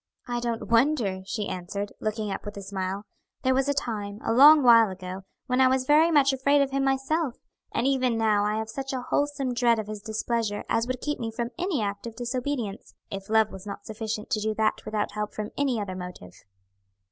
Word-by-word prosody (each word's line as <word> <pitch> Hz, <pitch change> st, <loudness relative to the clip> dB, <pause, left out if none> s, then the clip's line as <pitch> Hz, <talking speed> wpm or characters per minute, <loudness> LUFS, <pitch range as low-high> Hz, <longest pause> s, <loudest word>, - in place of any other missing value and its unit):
"I 240 Hz, 0 st, -1 dB
don't 235 Hz, -1 st, -3 dB
wonder," 230 Hz, -6 st, +2 dB
she 210 Hz, -1 st, -2 dB
answered, 200 Hz, +3 st, -4 dB
looking 215 Hz, -1 st, -2 dB
up -, -, -4 dB
with 205 Hz, -1 st, -7 dB
a 200 Hz, -, -6 dB
smile; 195 Hz, +1 st, -4 dB, 0.4 s
"there 260 Hz, -, +3 dB
was 270 Hz, +2 st, +1 dB
a -, -, +3 dB
time, 210 Hz, -6 st, -3 dB
a -, -, +1 dB
long 290 Hz, +4 st, +8 dB
while 230 Hz, -3 st, +7 dB
ago, 185 Hz, 0 st, -7 dB, 0.2 s
when 255 Hz, -1 st, +1 dB
I 260 Hz, -, +7 dB
was 260 Hz, 0 st, +1 dB
very 305 Hz, +4 st, +5 dB
much 280 Hz, -4 st, +4 dB
afraid 280 Hz, +2 st, +3 dB
of 275 Hz, -, -3 dB
him 275 Hz, 0 st, 0 dB
myself; 270 Hz, +1 st, 0 dB, 0.4 s
and 235 Hz, -, 0 dB
even 255 Hz, -3 st, +2 dB
now 215 Hz, -2 st, +3 dB
I 210 Hz, +1 st, 0 dB
have 220 Hz, 0 st, -2 dB
such 270 Hz, +4 st, -5 dB
a 255 Hz, -, -2 dB
wholesome 285 Hz, -2 st, -1 dB
dread 240 Hz, -1 st, +3 dB
of 220 Hz, -, -3 dB
his 210 Hz, 0 st, -7 dB
displeasure 220 Hz, -1 st, -2 dB
as 230 Hz, +1 st, +1 dB
would 255 Hz, -1 st, -3 dB
keep 295 Hz, 0 st, -2 dB
me 230 Hz, -, -2 dB
from 235 Hz, +1 st, -4 dB
any 350 Hz, -, 0 dB
act 200 Hz, +2 st, -4 dB
of 230 Hz, -, -8 dB
disobedience, 245 Hz, -3 st, -4 dB, 0.2 s
if 195 Hz, 0 st, -6 dB
love 220 Hz, -1 st, +3 dB
was 190 Hz, +1 st, -10 dB
not 200 Hz, -, -7 dB
sufficient 220 Hz, +1 st, -5 dB
to 225 Hz, -, +2 dB
do 215 Hz, 0 st, -1 dB
that 220 Hz, 0 st, 0 dB
without 210 Hz, -1 st, -2 dB
help 210 Hz, 0 st, -4 dB
from 210 Hz, 0 st, -4 dB
any 270 Hz, -5 st, 0 dB
other 195 Hz, -3 st, -4 dB
motive." 180 Hz, -, -9 dB
230 Hz, 215 wpm, -26 LUFS, 210-265 Hz, 0.4 s, long